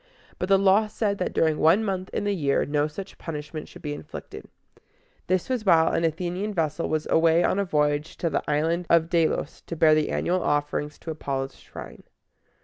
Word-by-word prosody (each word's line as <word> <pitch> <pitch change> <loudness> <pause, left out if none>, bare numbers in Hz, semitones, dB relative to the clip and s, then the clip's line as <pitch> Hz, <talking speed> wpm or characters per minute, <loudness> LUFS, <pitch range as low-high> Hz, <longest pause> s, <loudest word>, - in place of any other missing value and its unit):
But 180 - -2
the 195 - +6
law 195 +2 +4
said 210 -1 -2
that 180 - -1
during 160 -2 +1
one 170 +8 +4
month 190 -2 -3
in - - -2
the 205 0 0
year 145 -7 +1
no 145 +1 +1
such 185 +6 -9
punishment 150 -1 -6
should - - -14
be 150 -1 -3
inflicted. - - -9 0.8
This 185 -1 +1
was 255 -4 -1
while 165 -5 +4
an 165 - +1
Athenian 180 +5 -2
vessel 165 -1 -1
was 155 -1 -1
away 165 +1 +4
on 190 - +1
a 200 - +1
voyage 150 -2 0
to 170 - -1
the - - 0
Island 165 +4 0
of 165 -1 +4
De´los 165 -3 0
to 170 - -4
bear 155 -1 +5
the 155 -1 +2
annual 180 +1 0
offerings 145 0 -1
to 165 - -6
Apollo's 135 -3 -4
shrine. - - -11
165 Hz, 195 wpm, -25 LUFS, 150-185 Hz, 0.8 s, the